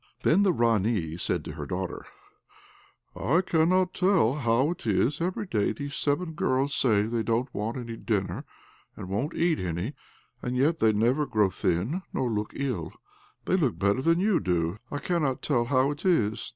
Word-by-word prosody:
Then 180 +6 +4
the 200 -2 +4
Ranee 110 - +1
said 85 -2 -1
to - - -5
her 75 -2 -7
daughter, 90 +2 -4 1.1
"I 160 +8 +2
cannot 180 +1 +2
tell 180 - +3
how 130 +1 +1
it 175 - -7
is, 125 - +1
every 185 +4 -1
day 105 - 0
those 145 -1 -6
seven 160 +3 -1
girls 135 -1 0
say 110 -7 +3
they 115 +1 -1
don't 115 +4 -1
want 110 +4 -3
any 115 -2 -6
dinner, 95 -7 -2 0.5
and 90 - -7
won't 120 - -2
eat 170 -2 +1
any; 90 - -3 0.5
and 125 +1 -2
yet 155 +6 +2
they 110 - +4
never 120 +8 +1
grow 105 -4 +2
thin 100 - -1
nor 125 -2 -1
look 105 -1 -2
ill; 120 -13 -3 0.5
they - - +2
look 145 - +1
better 100 +5 +1
than 165 +4 +3
you 200 -1 +3
do. 85 0 -1
I 145 - -3
cannot 150 -5 -1
tell 120 -5 +1
how 130 +2 +2
it 145 +3 -7
is." 115 - +1
125 Hz, 180 wpm, -27 LUFS, 105-155 Hz, 1.1 s, Then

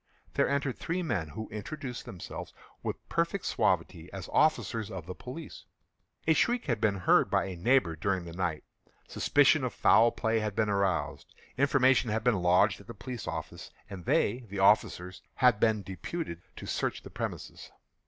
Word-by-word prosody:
There - - +2
entered 140 -2 -1
three 180 +2 -2
men, 100 - -1
who 110 +9 -7
introduced 125 +4 -6
themselves, 90 - -8 0.3
with - - -5
perfect - - -1
suavity, 85 -2 0
as 95 -3 -7
officers 115 -8 +2
of 95 -7 -7
the 90 - -6
police. 135 - -9 0.6
A 160 - +5
shriek 240 +9 +1
had 120 -7 -1
been 105 -3 +2
heard - - +4
by - - +2
a 95 -2 -5
neighbour 105 -2 +2
during 95 +1 -1
the 85 - -8
night; 85 -4 -2 0.4
suspicion 145 0 +3
of 125 -5 -2
foul 115 +2 +5
play 110 0 0
had 105 -2 -3
been 110 -1 +1
aroused; 100 -5 -1 0.2
information 130 -3 +3
had 110 +1 -1
been 115 -6 +2
lodged 90 +3 +3
at - - -18
the 115 - -8
police 125 +2 -7
office, - - -6 0.2
and 90 -3 -8
they 110 +5 +2
(the 100 - -6
officers) 95 -2 +2
had 125 -5 +4
been 110 -2 +2
deputed 95 - -5
to - - -9
search - - -2
the - - -11
premises. - - -6
110 Hz, 175 wpm, -30 LUFS, 95-130 Hz, 0.6 s, A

